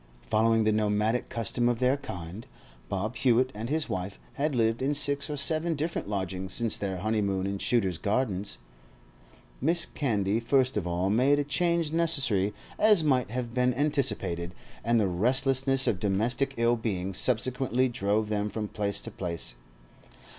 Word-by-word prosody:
Following 115 Hz, +1 st, +2 dB
the 110 Hz, -, +2 dB
nomadic 105 Hz, +2 st, 0 dB
custom 120 Hz, +1 st, 0 dB
of 120 Hz, -, 0 dB
their 130 Hz, +2 st, +2 dB
kind, 90 Hz, -5 st, -8 dB, 0.4 s
Bob 105 Hz, +5 st, -3 dB
Hewett 130 Hz, 0 st, +3 dB
and 110 Hz, +3 st, -5 dB
his 155 Hz, +1 st, 0 dB
wife 95 Hz, +2 st, -4 dB, 0.2 s
had 145 Hz, 0 st, -1 dB
lived 115 Hz, 0 st, +1 dB
in 140 Hz, +3 st, 0 dB
six 145 Hz, 0 st, +1 dB
or 150 Hz, -, -3 dB
seven 160 Hz, +4 st, +2 dB
different 155 Hz, -6 st, -3 dB
lodgings 95 Hz, -2 st, -3 dB
since 115 Hz, -3 st, +2 dB
their 95 Hz, -2 st, -3 dB
honeymoon 100 Hz, -1 st, -1 dB
in 100 Hz, 0 st, -3 dB
Shooter's 95 Hz, -9 st, +1 dB
Gardens. 100 Hz, -1 st, -1 dB, 1.1 s
Mrs. 170 Hz, +3 st, +1 dB
Candy 105 Hz, -6 st, 0 dB
first 130 Hz, +2 st, +1 dB
of 100 Hz, -4 st, -2 dB
all 90 Hz, +3 st, 0 dB
made 130 Hz, +6 st, +3 dB
a 145 Hz, -, +1 dB
change 170 Hz, +2 st, 0 dB
necessary, 135 Hz, -, +2 dB, 0.3 s
as 210 Hz, -6 st, +5 dB
might 130 Hz, -6 st, +1 dB
have 120 Hz, 0 st, -4 dB
been 125 Hz, 0 st, +1 dB
anticipated, 125 Hz, -, -1 dB, 0.3 s
and 115 Hz, +1 st, +2 dB
the 105 Hz, -, +2 dB
restlessness 130 Hz, +7 st, +3 dB
of 95 Hz, -, 0 dB
domestic 120 Hz, +8 st, 0 dB
ill 115 Hz, +1 st, +3 dB
being 95 Hz, -4 st, -3 dB
subsequently 125 Hz, +3 st, +1 dB
drove 105 Hz, -2 st, -1 dB
them 105 Hz, 0 st, -1 dB
from 105 Hz, 0 st, -4 dB
place 100 Hz, -1 st, -2 dB
to -, -, -7 dB
place. 85 Hz, -9 st, -4 dB
115 Hz, 160 wpm, -28 LUFS, 100-135 Hz, 1.1 s, as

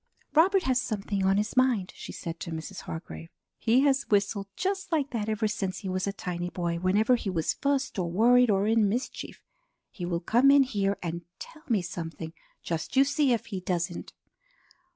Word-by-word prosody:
"Robert 370 Hz, +4 st, +4 dB
has 260 Hz, -1 st, +2 dB
something 200 Hz, -4 st, -2 dB
on 195 Hz, +1 st, +3 dB
his 210 Hz, +1 st, -1 dB
mind," 250 Hz, -8 st, +2 dB
she -, -, -8 dB
said 165 Hz, -1 st, -6 dB
to -, -, -6 dB
Mrs. 165 Hz, +3 st, -6 dB
Hargrave. 160 Hz, 0 st, -8 dB, 0.3 s
"He 240 Hz, +3 st, +3 dB
has 275 Hz, -1 st, +2 dB
whistled 200 Hz, -1 st, +1 dB
just 385 Hz, -1 st, -2 dB
like 295 Hz, -4 st, 0 dB
that 220 Hz, -3 st, -2 dB
ever 215 Hz, 0 st, 0 dB
since 195 Hz, -3 st, -3 dB
he 195 Hz, -, -5 dB
was 185 Hz, +1 st, -1 dB
a -, -, 0 dB
tiny 175 Hz, -2 st, -4 dB
boy 170 Hz, -1 st, -2 dB
whenever 205 Hz, +7 st, +3 dB
he 225 Hz, -4 st, -3 dB
was 165 Hz, -4 st, 0 dB
fussed 280 Hz, -6 st, -1 dB
or 175 Hz, -2 st, -1 dB
worried 245 Hz, +5 st, +5 dB
or 195 Hz, -1 st, +2 dB
in 220 Hz, -1 st, +3 dB
mischief. 240 Hz, +6 st, -4 dB, 0.5 s
He 180 Hz, -4 st, -5 dB
will 170 Hz, -1 st, -1 dB
come 240 Hz, +10 st, +4 dB
in 280 Hz, 0 st, +7 dB
here 200 Hz, -6 st, -1 dB
and 170 Hz, 0 st, -3 dB, 0.2 s
tell 310 Hz, -, -11 dB
me 210 Hz, -6 st, +2 dB
something; 165 Hz, -2 st, -6 dB, 0.3 s
just 165 Hz, +7 st, -4 dB
you 270 Hz, -, +7 dB
see 285 Hz, -1 st, +2 dB
if 235 Hz, -, 0 dB
he 195 Hz, -4 st, -5 dB
doesn't. 175 Hz, -1 st, -3 dB
205 Hz, 195 wpm, -28 LUFS, 180-255 Hz, 0.5 s, in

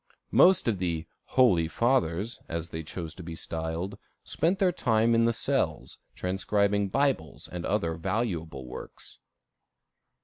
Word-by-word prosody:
Most 185 Hz, -6 st, +6 dB
of 105 Hz, -5 st, +1 dB
the 85 Hz, -3 st, -1 dB, 0.2 s
"Holy 95 Hz, -11 st, +4 dB
Fathers," 115 Hz, -1 st, +1 dB
as 85 Hz, 0 st, -3 dB
they 80 Hz, -, -5 dB
chose 80 Hz, 0 st, -6 dB
to 90 Hz, -, -10 dB
be 85 Hz, -1 st, -7 dB
styled, 80 Hz, +5 st, -4 dB, 0.2 s
spent 175 Hz, +4 st, +1 dB
their 190 Hz, -2 st, +3 dB
time 115 Hz, -8 st, +2 dB
in 115 Hz, 0 st, +4 dB
the 115 Hz, -, +4 dB
cells, 115 Hz, -, -1 dB, 0.2 s
transcribing 100 Hz, +2 st, +1 dB
Bibles 110 Hz, -, 0 dB
and 90 Hz, -1 st, -5 dB
other 95 Hz, -5 st, 0 dB
valuable 85 Hz, -, -2 dB
works. 60 Hz, -, -10 dB
95 Hz, 135 wpm, -28 LUFS, 80-115 Hz, 0.2 s, Most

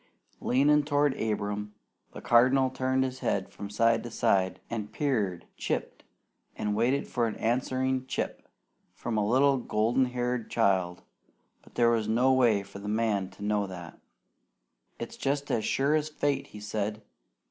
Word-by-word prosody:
Leaning 145 Hz, +4 st, +3 dB
toward 145 Hz, -1 st, +2 dB
Abram, 105 Hz, -1 st, -2 dB, 0.4 s
the -, -, -9 dB
Cardinal 130 Hz, +2 st, +4 dB
turned 130 Hz, 0 st, +1 dB
his 130 Hz, 0 st, -4 dB
head -, -, -1 dB
from 100 Hz, -, -7 dB
side 115 Hz, +2 st, +2 dB
to 120 Hz, -, -7 dB
side, 95 Hz, -4 st, +1 dB
and 110 Hz, -3 st, -5 dB
peered, 105 Hz, -, -1 dB
"chipped," -, -, -3 dB, 0.5 s
and 105 Hz, -1 st, -2 dB
waited 125 Hz, +6 st, +1 dB
for 120 Hz, -2 st, 0 dB
an 110 Hz, -, -4 dB
answering 130 Hz, +2 st, 0 dB
"Chip" -, -, -4 dB, 0.5 s
from 120 Hz, -1 st, -4 dB
a 105 Hz, -, +2 dB
little 135 Hz, +6 st, +3 dB
golden 120 Hz, +2 st, +1 dB
haired 125 Hz, -1 st, -2 dB
child, 95 Hz, -5 st, +1 dB, 0.6 s
but -, -, -21 dB
there 120 Hz, 0 st, +4 dB
was 110 Hz, -2 st, +1 dB
no 125 Hz, +4 st, +3 dB
way 115 Hz, -6 st, +3 dB
for 100 Hz, -, -11 dB
the 105 Hz, +1 st, -6 dB
man 105 Hz, -3 st, 0 dB
to 105 Hz, -, -9 dB
know 105 Hz, -1 st, +1 dB
that. 90 Hz, -3 st, -9 dB, 1.0 s
"It's -, -, -7 dB
jest 140 Hz, +1 st, -1 dB
as 110 Hz, -, 0 dB
sure 140 Hz, +2 st, +1 dB
as 155 Hz, 0 st, +1 dB
fate," 140 Hz, -2 st, -1 dB
he 105 Hz, -, -11 dB
said. 105 Hz, 0 st, -3 dB
115 Hz, 160 wpm, -28 LUFS, 105-130 Hz, 1.0 s, Cardinal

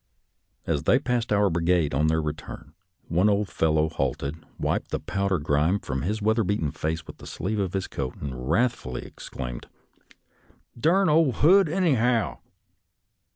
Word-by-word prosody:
As 75 Hz, -3 st, -1 dB
they 125 Hz, -, +5 dB
passed 125 Hz, -4 st, -1 dB
our 100 Hz, -2 st, +3 dB
brigade 85 Hz, -2 st, +1 dB
on 75 Hz, +3 st, +2 dB
their 80 Hz, 0 st, +1 dB
return, 75 Hz, 0 st, -7 dB, 0.3 s
one 90 Hz, +5 st, +3 dB
old 100 Hz, -1 st, +1 dB
fel 80 Hz, -1 st, +1 dB
low 80 Hz, 0 st, +3 dB
halted, 70 Hz, +1 st, -3 dB
wiped -, -, -1 dB
the -, -, -2 dB
powder 100 Hz, -1 st, -1 dB
grime 75 Hz, +5 st, +1 dB
from 65 Hz, -9 st, -4 dB
his 105 Hz, +5 st, -2 dB
weather 110 Hz, +1 st, +2 dB
beaten 90 Hz, -7 st, -1 dB
face 80 Hz, +2 st, -3 dB
with -, -, -11 dB
the -, -, -12 dB
sleeve 105 Hz, +5 st, -3 dB
of 95 Hz, -3 st, -1 dB
his 95 Hz, -1 st, -1 dB
coat, 65 Hz, -3 st, -5 dB
and 70 Hz, -3 st, -6 dB
wrathfuUy 70 Hz, -, -1 dB
exclaimed, -, -, -7 dB, 0.6 s
" -, -, -26 dB
Durn 185 Hz, +5 st, +4 dB
ole 155 Hz, -3 st, +4 dB
Hood, 185 Hz, -, +5 dB
anyhow! 125 Hz, -, +1 dB
90 Hz, 160 wpm, -25 LUFS, 75-115 Hz, 0.6 s, they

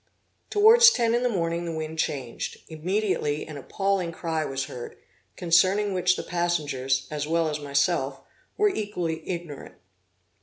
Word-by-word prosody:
Towards 455 Hz, +3 st, +8 dB
ten 235 Hz, -, +1 dB
in 240 Hz, -, +2 dB
the 250 Hz, -, +1 dB
morning 170 Hz, -4 st, -1 dB
the 170 Hz, -, -3 dB
wind 160 Hz, 0 st, -5 dB
changed; 130 Hz, -7 st, -3 dB
immediately 160 Hz, -2 st, -1 dB
an 155 Hz, -, -9 dB
appalling 190 Hz, +4 st, -1 dB
cry 160 Hz, -1 st, -2 dB
was 135 Hz, -2 st, -3 dB
heard, 120 Hz, -1 st, -8 dB, 0.4 s
concerning 185 Hz, +4 st, +3 dB
which 180 Hz, 0 st, +2 dB
the -, -, -5 dB
passengers, 145 Hz, -7 st, -1 dB
as 150 Hz, -1 st, -3 dB
well 165 Hz, 0 st, +1 dB
as 150 Hz, -1 st, -2 dB
myself, 140 Hz, -1 st, 0 dB, 0.4 s
were 420 Hz, 0 st, +4 dB
equally 180 Hz, -, -3 dB
ignorant. 170 Hz, -6 st, -6 dB
170 Hz, 145 wpm, -26 LUFS, 150-195 Hz, 0.4 s, Towards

